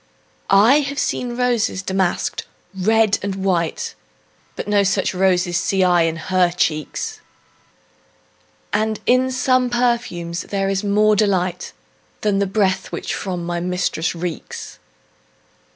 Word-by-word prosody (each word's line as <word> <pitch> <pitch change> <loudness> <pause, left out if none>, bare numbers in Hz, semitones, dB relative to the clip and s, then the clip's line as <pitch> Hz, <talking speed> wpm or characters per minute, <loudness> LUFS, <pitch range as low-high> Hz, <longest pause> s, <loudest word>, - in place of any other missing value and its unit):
I 220 +9 +6
have 280 -1 -3
seen 245 -4 -1
roses 240 -6 0
damask'd, 190 -2 -1 0.3
red 210 +2 +2
and 200 -1 -3
white, 185 -4 -1 0.6
But - - -5
no 205 -1 +3
such 195 -1 +1
roses 180 -1 +2
see 190 +2 +1
I 175 -1 +4
in 165 -1 +1
her 180 +2 +1
cheeks; 155 -4 -2 1.5
And 215 +1 0
in 255 +1 +3
some 255 -1 +2
perfumes 235 -9 -1
is - - -19
there 195 -1 0 0.2
more 210 +1 +4
delight 185 -4 0 0.5
Than 205 -2 +1
in - - +1
the 200 - +1
breath 190 -1 0
that - - -5
from 180 -3 -4
my 175 0 -2
mistress 180 -1 -1
reeks. 170 -1 -6
195 Hz, 130 wpm, -20 LUFS, 180-215 Hz, 1.5 s, I